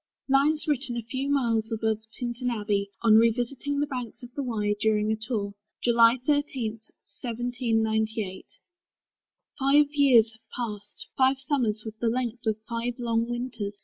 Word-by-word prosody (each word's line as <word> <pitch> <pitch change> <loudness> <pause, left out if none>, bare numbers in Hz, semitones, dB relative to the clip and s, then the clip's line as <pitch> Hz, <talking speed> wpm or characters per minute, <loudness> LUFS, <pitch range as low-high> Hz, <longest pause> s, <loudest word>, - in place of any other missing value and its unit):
LINES 285 +3 +3
WRITTEN 265 -4 -1
A 235 - -3
FEW 260 +4 -3
MILES 230 -5 +1
ABOVE 220 -1 0
TINTERN 245 +1 -3
ABBEY, 205 -3 -1
ON 220 -2 +7
REVISITING 245 +5 0
THE - - +2
BANKS 250 -3 -6
OF 245 0 -10
THE 285 - -3
WYE 210 -5 -1
DURING 215 0 +2
A - - +2
TOUR, 215 -2 -3 0.3
July 235 0 +5
13, 285 -6 0 0.5
1798. 225 -4 -1 1.1
Five 280 +2 +5
years 260 -7 +5
have 220 0 -21
passed; 210 -4 -6
five 265 0 +3
summers, 240 -6 -1
with 220 0 -8
the 235 - +1
length 245 -1 -2
Of 215 -1 +1
five 235 +1 -2
long 230 -1 0
winters! 240 -4 -4
235 Hz, 145 wpm, -27 LUFS, 220-260 Hz, 1.1 s, ON